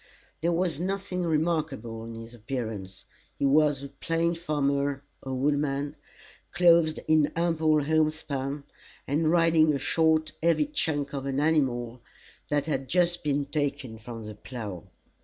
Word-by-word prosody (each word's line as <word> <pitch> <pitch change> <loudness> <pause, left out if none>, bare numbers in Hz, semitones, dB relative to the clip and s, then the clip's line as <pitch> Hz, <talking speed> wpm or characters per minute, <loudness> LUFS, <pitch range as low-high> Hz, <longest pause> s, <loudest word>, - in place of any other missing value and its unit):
There 170 +2 +2
was 170 -3 0
nothing 190 0 -2
remarkable 155 -9 -1
in 115 0 -7
his 115 +1 -9
appearance. 110 -5 -5 0.3
He - - 0
was 145 0 +3
a 140 - -6
plain 165 +4 0
farmer 140 -4 -1 0.2
or 130 -1 -4
woodman, 140 +1 0 0.6
clothed 170 -3 +4
in 155 -1 +4
ample 160 -3 +2
homespun, 150 -2 0 0.4
and 155 +3 +1
riding 165 -2 +4
a - - +1
short 160 +1 +2
heavy 170 - +3
chunk 150 - -2
of 140 -1 -3
an 135 0 -1
animal, 125 -6 +1 0.5
that 145 -1 0
had 135 -4 -2
just 175 +1 +2
been 145 -1 0
taken 140 -6 -3
from 115 -1 -8
the 105 - -7
plough. 105 - -7
145 Hz, 140 wpm, -27 LUFS, 135-160 Hz, 0.6 s, clothed